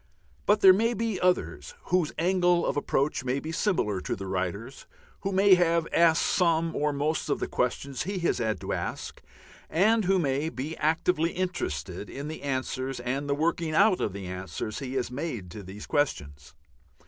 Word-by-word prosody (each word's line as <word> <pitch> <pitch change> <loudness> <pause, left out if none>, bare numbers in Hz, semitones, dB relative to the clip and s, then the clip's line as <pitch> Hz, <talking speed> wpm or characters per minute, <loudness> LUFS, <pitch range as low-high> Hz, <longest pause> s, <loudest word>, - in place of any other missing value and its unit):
But 210 +1 +4
there 190 -1 +9
may 230 +5 +1
be 225 -4 -2
others 185 - 0 0.2
whose 180 -4 +2
angle 175 0 +2
of - - 0
approach 145 -1 0
may 130 +2 -1
be 155 +3 -6
similar 165 - 0
to - - -3
the 95 - -7
writer's, 95 +7 -4 0.3
who 195 - -3
may 195 +1 +5
have 170 -2 +3
asked 165 -1 +4
some 165 -2 +2
or 150 0 +1
most 150 +2 -1
of - - +1
the - - -2
questions 130 +2 -2
he 195 +3 -3
has 175 -2 0
had 110 -2 -1
to - - -3
ask, - - -5 0.5
and 215 +5 +3
who 190 +1 +3
may 145 -1 0
be 155 +2 -5
actively 160 +2 +1
interested 100 - -3
in 140 +2 -6
the 155 - -7
answers 130 -1 -3
and 135 +4 -3
the 140 - +2
working 160 +1 0
out 200 +1 +4
of 105 - 0
the 100 0 -7
answers 95 +3 -5
he 135 -1 -5
has 125 -2 -1
made 125 - -5
to 105 - -8
these 100 +2 -9
questions. 75 - -2
150 Hz, 185 wpm, -27 LUFS, 125-180 Hz, 0.5 s, there